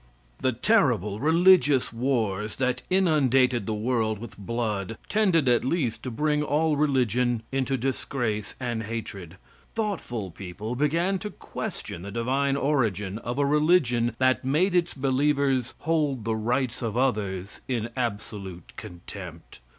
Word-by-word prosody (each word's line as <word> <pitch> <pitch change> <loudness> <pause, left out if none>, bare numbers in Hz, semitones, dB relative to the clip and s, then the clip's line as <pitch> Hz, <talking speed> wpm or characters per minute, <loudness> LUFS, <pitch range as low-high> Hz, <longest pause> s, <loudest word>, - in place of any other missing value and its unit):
The 130 - +1
terrible 120 - +2
religious 160 -3 +4
wars 110 -4 -1
that 125 -1 0
inundated 135 - +3
the 110 - -1
world 110 -1 0
with 115 +1 -9
blood 110 -1 -3
tended 185 -9 +3
at 120 -1 +4
least 130 -4 -1
to 130 - -4
bring 150 +4 0
all 150 +1 +1
religion 125 -5 +1
into 135 0 0
disgrace 120 -4 -2
and 120 -3 -2
hatred. 100 -6 -6 0.4
Thoughtful 165 - -3
people 95 +6 -6
began 165 +8 +1
to 210 - -5
question 85 - -6
the 100 - -7
divine 130 +6 0
origin 110 -8 0
of 120 +2 -4
a 145 - +2
religion 140 -6 +3
that 130 +1 +2
made 155 +9 +2
its 175 -1 +1
believers 135 -1 +1
hold 145 -7 0
the 115 -1 0
rights 120 +3 -1
of 115 -1 -2
others 100 -7 -1
in 120 -3 -1
absolute 100 -7 -5
contempt. 85 -1 -9
125 Hz, 135 wpm, -26 LUFS, 110-145 Hz, 0.4 s, religious